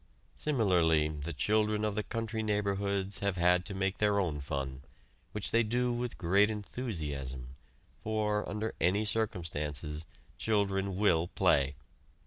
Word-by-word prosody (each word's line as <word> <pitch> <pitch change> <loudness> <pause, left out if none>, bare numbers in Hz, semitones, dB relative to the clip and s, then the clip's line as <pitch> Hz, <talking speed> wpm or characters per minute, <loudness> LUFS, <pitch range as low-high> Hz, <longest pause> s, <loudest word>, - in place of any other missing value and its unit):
Similarly 90 - +3
the 75 +2 -5
children 105 +7 +1
of 105 - 0
the 105 - 0
country 115 0 -3
neighborhoods 100 -2 0
have 100 -2 0
had 90 +1 +4
to 100 - -4
make 95 0 -1
their 105 -1 +3
own 80 -7 -1
fun, 70 -1 -4 0.5
which 105 -2 -2
they 115 - +4
do 120 +2 +1
with 120 0 -3
great 100 +4 +4
enthusiasm, 75 - -3 0.5
for, 105 -1 0
under 105 +2 -2
any 100 +6 +3
circumstances, 80 -8 -2 0.3
children 100 -3 +1
will 90 -4 +3
play. 70 -6 +2
100 Hz, 130 wpm, -32 LUFS, 80-105 Hz, 0.5 s, had